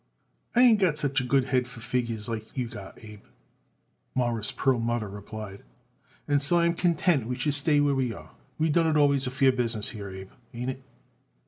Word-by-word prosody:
"I 245 Hz, -, +6 dB
ain't 235 Hz, -4 st, +6 dB
got 175 Hz, -6 st, +2 dB
such 140 Hz, -2 st, 0 dB
a -, -, -4 dB
good 135 Hz, +1 st, +2 dB
head 125 Hz, -1 st, 0 dB
for 125 Hz, -1 st, -12 dB
figures 120 Hz, -3 st, -3 dB
like 110 Hz, +2 st, -6 dB
you 125 Hz, -2 st, -1 dB
got 100 Hz, -4 st, -10 dB
it, -, -, -14 dB
Abe," 105 Hz, -1 st, -12 dB, 0.9 s
Morris 120 Hz, -4 st, 0 dB
Perlmutter 120 Hz, -4 st, 0 dB
replied, 100 Hz, 0 st, -8 dB, 0.7 s
"and 145 Hz, -1 st, +2 dB
so 160 Hz, +5 st, +4 dB
I 170 Hz, -, +3 dB
am 170 Hz, -, +2 dB
content 170 Hz, -7 st, +1 dB
we 125 Hz, 0 st, -3 dB
should 145 Hz, +3 st, 0 dB
stay 145 Hz, +1 st, +4 dB
where 145 Hz, -1 st, +2 dB
we 130 Hz, -3 st, 0 dB
are. -, -, -11 dB, 0.3 s
We 160 Hz, +1 st, +1 dB
done 165 Hz, +2 st, +3 dB
it 155 Hz, -1 st, +2 dB
always 140 Hz, -2 st, +3 dB
a -, -, 0 dB
fair 130 Hz, +1 st, +3 dB
business 115 Hz, -4 st, -2 dB
here, 100 Hz, -4 st, -7 dB
Abe. 95 Hz, 0 st, -9 dB, 0.2 s
Ain't 125 Hz, +2 st, -2 dB
it?" 130 Hz, 0 st, -11 dB
130 Hz, 205 wpm, -27 LUFS, 115-145 Hz, 0.9 s, I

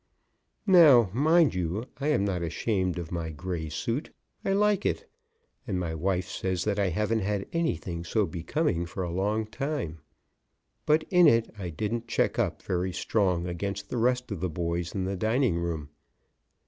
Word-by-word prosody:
Now, 150 Hz, -, +7 dB
mind 160 Hz, +5 st, +4 dB
you, 90 Hz, +5 st, -2 dB
I 140 Hz, -, -1 dB
am 150 Hz, -10 st, +2 dB
not 95 Hz, -3 st, -1 dB
ashamed 90 Hz, +2 st, -1 dB
of 85 Hz, -3 st, -5 dB
my 85 Hz, -2 st, -3 dB
gray 80 Hz, +1 st, -4 dB
suit. 115 Hz, -, -2 dB, 0.3 s
I -, -, 0 dB
like 205 Hz, 0 st, +2 dB
it, -, -, -1 dB, 0.6 s
and 95 Hz, -4 st, -1 dB
my 85 Hz, -3 st, -2 dB
wife 90 Hz, +2 st, -1 dB
says 95 Hz, -2 st, -2 dB
that 105 Hz, -1 st, 0 dB
I 100 Hz, -2 st, +2 dB
haven't 105 Hz, +5 st, 0 dB
had 100 Hz, -1 st, -1 dB
anything 85 Hz, -, -1 dB
so 105 Hz, +4 st, +1 dB
becoming 85 Hz, -, -1 dB
for 95 Hz, +2 st, -4 dB
a 85 Hz, -, -3 dB
long 105 Hz, +4 st, 0 dB
time. 125 Hz, -, -4 dB, 0.9 s
But 155 Hz, +1 st, +4 dB
in 180 Hz, -2 st, +7 dB
it 115 Hz, 0 st, +3 dB
I 95 Hz, -4 st, -5 dB
didn't 110 Hz, +8 st, -3 dB
check 115 Hz, -, 0 dB
up -, -, -1 dB
very 90 Hz, 0 st, -1 dB
strong 90 Hz, -5 st, +1 dB
against 100 Hz, +3 st, -4 dB
the -, -, -1 dB
rest 125 Hz, +1 st, +1 dB
of 100 Hz, -, -3 dB
the 90 Hz, +1 st, -1 dB
boys 85 Hz, +2 st, -3 dB
in 95 Hz, -, -1 dB
the 95 Hz, +1 st, -2 dB
dining 110 Hz, -1 st, +1 dB
room. 80 Hz, -4 st, -3 dB
95 Hz, 175 wpm, -28 LUFS, 85-120 Hz, 0.9 s, Now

